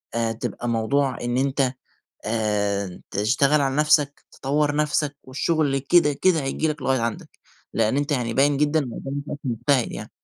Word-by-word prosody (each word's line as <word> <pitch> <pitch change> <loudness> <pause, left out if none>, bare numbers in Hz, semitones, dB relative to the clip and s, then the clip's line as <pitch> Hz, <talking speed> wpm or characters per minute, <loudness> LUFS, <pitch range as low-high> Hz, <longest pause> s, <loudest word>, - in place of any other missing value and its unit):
آآ، 115 -1 0
تبقى 115 +1 -4
موضوع 130 +4 +1
إن 120 +1 -1
أنت 135 -1 +1 0.5
آآ، 105 -4 -1
تشتغل 135 +8 +2
على 135 -1 0
نفسك، 150 -1 +2
تطور 145 +2 0
نفسك، 150 -1 0
والشغل 140 +1 0
كده 150 +2 +3
كده 165 +3 +2
هييجي 135 +3 -1
لك 150 -2 -3
لغاية 130 -1 +1
عندك؛ 115 -1 -3 0.5
لأن 115 +3 +2
أنت 145 +1 0
يعني 120 -4 -1
باين 140 +1 +3
جدًا 150 +2 +2
إن - - -2
قدّامي 140 +1 -5
شخص - - -5
مجتهد 120 +1 +1
يعني. - - -7
135 Hz, 165 wpm, -23 LUFS, 115-145 Hz, 0.5 s, كده